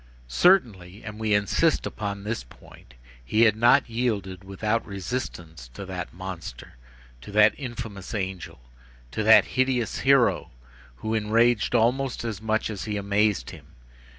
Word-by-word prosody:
Certainly, 100 Hz, -, +2 dB
and 105 Hz, 0 st, -8 dB
we 110 Hz, -2 st, +1 dB
insist 105 Hz, +11 st, +1 dB
upon 100 Hz, -1 st, -5 dB
this 110 Hz, -, -3 dB
point, -, -, -18 dB, 0.3 s
he 110 Hz, -, +2 dB
had 110 Hz, -2 st, +5 dB
not 120 Hz, +5 st, +4 dB
yielded 105 Hz, -6 st, -2 dB
without 105 Hz, +4 st, -2 dB
resistance 90 Hz, -, -6 dB
to 100 Hz, -, -7 dB
that 90 Hz, -2 st, -6 dB
monster, 90 Hz, -8 st, -8 dB, 0.5 s
to 85 Hz, -, -10 dB
that 105 Hz, +1 st, +6 dB
infamous 115 Hz, -8 st, -7 dB
angel, 95 Hz, -3 st, -5 dB, 0.5 s
to 110 Hz, -, -3 dB
that 110 Hz, +1 st, +7 dB
hideous 130 Hz, -3 st, 0 dB
hero, 135 Hz, -2 st, +3 dB, 0.5 s
who 110 Hz, -, -4 dB
enraged 110 Hz, +2 st, +2 dB
almost 125 Hz, +3 st, +1 dB
as 110 Hz, -4 st, -4 dB
much 110 Hz, 0 st, -1 dB
as 100 Hz, -, -6 dB
he 105 Hz, -2 st, -3 dB
amazed 100 Hz, -, 0 dB
him. -, -, -15 dB
105 Hz, 140 wpm, -25 LUFS, 95-115 Hz, 0.5 s, that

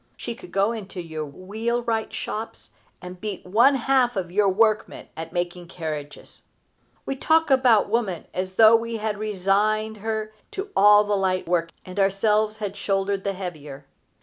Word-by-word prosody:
She -, -, -5 dB
could 360 Hz, -, -13 dB
go 200 Hz, +3 st, +2 dB
into 200 Hz, -5 st, -7 dB
your 160 Hz, -3 st, -5 dB
wheelwright 225 Hz, -, -2 dB
shops 220 Hz, +2 st, -6 dB, 0.3 s
and 180 Hz, 0 st, -9 dB
beat 210 Hz, -3 st, -5 dB
one 235 Hz, +9 st, +4 dB
half 255 Hz, -1 st, +2 dB
of 180 Hz, -3 st, -3 dB
your 200 Hz, +1 st, +3 dB
workmen 215 Hz, +2 st, +1 dB
at 160 Hz, 0 st, -7 dB
making 175 Hz, 0 st, -3 dB
carriages. 155 Hz, -4 st, -7 dB, 0.6 s
We 270 Hz, -, -2 dB
talk 320 Hz, +3 st, +2 dB
about 255 Hz, -5 st, +5 dB
woman 205 Hz, -6 st, -1 dB
as 185 Hz, 0 st, -3 dB
though 220 Hz, +1 st, +8 dB
we 230 Hz, 0 st, -1 dB
had 210 Hz, -1 st, -3 dB
resigned 215 Hz, +2 st, 0 dB
to -, -, -16 dB
her 215 Hz, 0 st, -3 dB, 0.4 s
all 205 Hz, +1 st, +7 dB
the 205 Hz, 0 st, 0 dB
light 185 Hz, -2 st, 0 dB
work, 170 Hz, -1 st, +1 dB, 0.2 s
and 185 Hz, +2 st, -6 dB
ourselves 210 Hz, +2 st, +2 dB
had 205 Hz, -2 st, -4 dB
shouldered 195 Hz, -1 st, -1 dB
the 200 Hz, -, -1 dB
heavier. 150 Hz, -7 st, -8 dB
205 Hz, 160 wpm, -24 LUFS, 185-220 Hz, 0.6 s, though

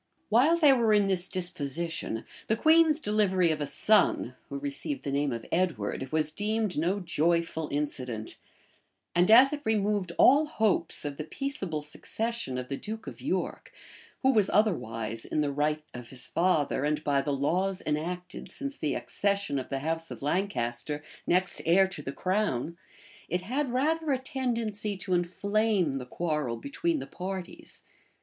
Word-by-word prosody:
While 265 Hz, +10 st, +4 dB
they 300 Hz, -5 st, +6 dB
were 230 Hz, -4 st, +3 dB
in 205 Hz, -1 st, +4 dB
this 185 Hz, -2 st, +3 dB
disposition, 165 Hz, -7 st, +1 dB, 0.2 s
the 220 Hz, -, +2 dB
queen's 315 Hz, +3 st, +5 dB
delivery 200 Hz, -, +2 dB
of 155 Hz, -1 st, -2 dB
a 145 Hz, -, 0 dB
son, 215 Hz, +8 st, +3 dB
who -, -, -4 dB
received 285 Hz, 0 st, -4 dB
the 140 Hz, -, -3 dB
name 140 Hz, 0 st, 0 dB
of 115 Hz, -1 st, -5 dB
Edward, 155 Hz, -, -1 dB
was 155 Hz, -1 st, +1 dB
deemed 210 Hz, +2 st, -1 dB
no 175 Hz, +6 st, 0 dB
joyful 165 Hz, -2 st, 0 dB
incident; 130 Hz, -6 st, -3 dB, 0.8 s
and 175 Hz, +2 st, +3 dB
as 255 Hz, +6 st, +8 dB
it 295 Hz, -, -4 dB
removed 205 Hz, -5 st, 0 dB
all 290 Hz, +4 st, +6 dB
hopes 215 Hz, -, +1 dB
of 145 Hz, -1 st, -4 dB
the 155 Hz, -, -3 dB
peaceable 190 Hz, -, -4 dB
succession 220 Hz, -, -3 dB
of 125 Hz, 0 st, -4 dB
the 140 Hz, -, -4 dB
duke 220 Hz, +1 st, -6 dB
of -, -, -9 dB
York, -, -, -3 dB, 0.5 s
who 265 Hz, 0 st, +4 dB
was 210 Hz, -4 st, +4 dB
otherwise, 115 Hz, -, 0 dB
in 150 Hz, -, -1 dB
the 145 Hz, -1 st, 0 dB
right 150 Hz, +2 st, 0 dB
of 125 Hz, -1 st, -9 dB
his 130 Hz, -1 st, -5 dB
father, 160 Hz, -6 st, +1 dB
and 150 Hz, +1 st, 0 dB
by 140 Hz, -1 st, +2 dB
the 145 Hz, -, -2 dB
laws 180 Hz, +8 st, 0 dB
enacted 175 Hz, +4 st, -4 dB
since 280 Hz, -1 st, -6 dB
the 150 Hz, -, -1 dB
accession 200 Hz, -8 st, -1 dB
of 130 Hz, -, -7 dB
the 135 Hz, -1 st, -3 dB
house 165 Hz, +2 st, -2 dB
of -, -, -8 dB
Lancaster, 150 Hz, -4 st, -2 dB, 0.2 s
next 185 Hz, +1 st, +1 dB
heir 180 Hz, +4 st, +5 dB
to 190 Hz, -, -7 dB
the 135 Hz, -, -5 dB
crown, 175 Hz, -, -1 dB, 0.5 s
it 180 Hz, -, -1 dB
had 260 Hz, +7 st, -1 dB
rather 310 Hz, +5 st, 0 dB
a 265 Hz, -, +2 dB
tendency 230 Hz, -6 st, -3 dB
to 185 Hz, -1 st, -2 dB
inflame 185 Hz, -3 st, +1 dB
the 125 Hz, -, -8 dB
quarrel 150 Hz, -6 st, -2 dB
between 330 Hz, +3 st, -2 dB
the -, -, -5 dB
parties. 185 Hz, 0 st, -7 dB
180 Hz, 165 wpm, -28 LUFS, 150-220 Hz, 0.8 s, as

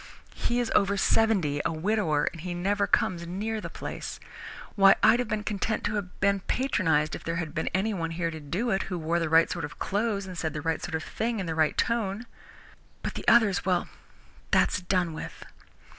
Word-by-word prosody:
He 240 Hz, +1 st, -1 dB
is 240 Hz, -, -1 dB
over 200 Hz, 0 st, +3 dB
seventy, 190 Hz, -9 st, +2 dB
a -, -, 0 dB
widower, 165 Hz, -2 st, +1 dB
and 165 Hz, -, -9 dB
he 175 Hz, 0 st, -4 dB
never 200 Hz, +3 st, 0 dB
comes 170 Hz, -2 st, +1 dB
near 215 Hz, +5 st, -3 dB
the -, -, -6 dB
place. -, -, -6 dB, 0.6 s
Why, 195 Hz, -2 st, +7 dB
I'd 240 Hz, -, +6 dB
have 245 Hz, -, -1 dB
been 215 Hz, -1 st, -2 dB
content 210 Hz, +1 st, -2 dB
to -, -, -1 dB
have 200 Hz, -4 st, -4 dB
been 200 Hz, 0 st, +2 dB
patronized 185 Hz, -, +1 dB
if -, -, -6 dB
there 165 Hz, -, -2 dB
had 160 Hz, -3 st, -3 dB
been 160 Hz, -, -2 dB
anyone 190 Hz, -4 st, -1 dB
here 165 Hz, 0 st, -2 dB
to 160 Hz, -, -7 dB
do 180 Hz, +11 st, -2 dB
it, 195 Hz, -, +1 dB
who 180 Hz, -, -2 dB
wore 165 Hz, +1 st, 0 dB
the 165 Hz, -2 st, -1 dB
right 165 Hz, +1 st, +6 dB
sort 170 Hz, -, -3 dB
of 145 Hz, -, -6 dB
clothes 205 Hz, 0 st, -1 dB
and 185 Hz, -1 st, -8 dB
said 160 Hz, -2 st, -2 dB
the 150 Hz, -, -4 dB
right 165 Hz, 0 st, -1 dB
sort 170 Hz, -, -4 dB
of 160 Hz, -, -3 dB
thing 230 Hz, 0 st, -2 dB
in 190 Hz, -, -2 dB
the 165 Hz, -, -2 dB
right 160 Hz, -1 st, +1 dB
tone. 225 Hz, -2 st, 0 dB, 0.8 s
But -, -, -3 dB
the -, -, -7 dB
others 220 Hz, -5 st, +5 dB
well, 180 Hz, -1 st, 0 dB, 0.6 s
that's -, -, +3 dB
done 180 Hz, -2 st, 0 dB
with." 155 Hz, -, -8 dB
185 Hz, 210 wpm, -27 LUFS, 165-210 Hz, 0.8 s, Why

